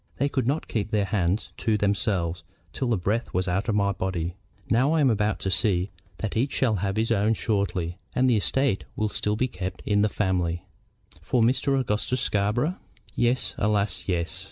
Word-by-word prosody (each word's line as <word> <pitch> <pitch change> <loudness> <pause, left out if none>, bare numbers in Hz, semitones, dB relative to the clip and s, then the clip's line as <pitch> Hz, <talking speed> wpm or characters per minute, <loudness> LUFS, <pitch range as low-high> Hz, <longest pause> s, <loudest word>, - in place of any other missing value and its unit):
They 140 +2 +1
could 130 -4 -1
not 145 +4 0
keep 110 -2 -2
their 105 -2 +1
hands 95 0 0
to 110 -2 +1
themselves 100 -4 0 0.3
till 130 - -2
the 115 -3 +2
breath 105 +5 -1
was 90 +1 +1
out 95 +5 0
of 110 - +2
my 100 -1 +2
body. 90 -3 -2 0.3
Now 130 +7 +3
I 165 - +3
am 135 -4 +5
about 105 -1 +1
to 95 - -1
see 95 -1 +1 0.3
that 110 - -3
each 130 +5 +1
shall 115 -6 +2
have 100 +2 -1
his 115 +1 +1
own 110 +1 +3
shortly, 95 -5 -1 0.2
and 130 +1 +3
the 125 - +4
estate 130 +1 +1
will 110 0 0
still 105 0 -1
be 125 +4 +1
kept 90 -5 -6
in 105 0 +3
the 105 - +3
family." 90 -3 0 0.6
"For 120 -3 +2
Mr. 135 +3 +2
Augustus 125 +1 -1
Scarborough?" 120 - 0 0.4
"Yes, 120 +1 +1
alas, 105 -1 0
yes! 90 0 -1
105 Hz, 190 wpm, -26 LUFS, 95-120 Hz, 0.6 s, am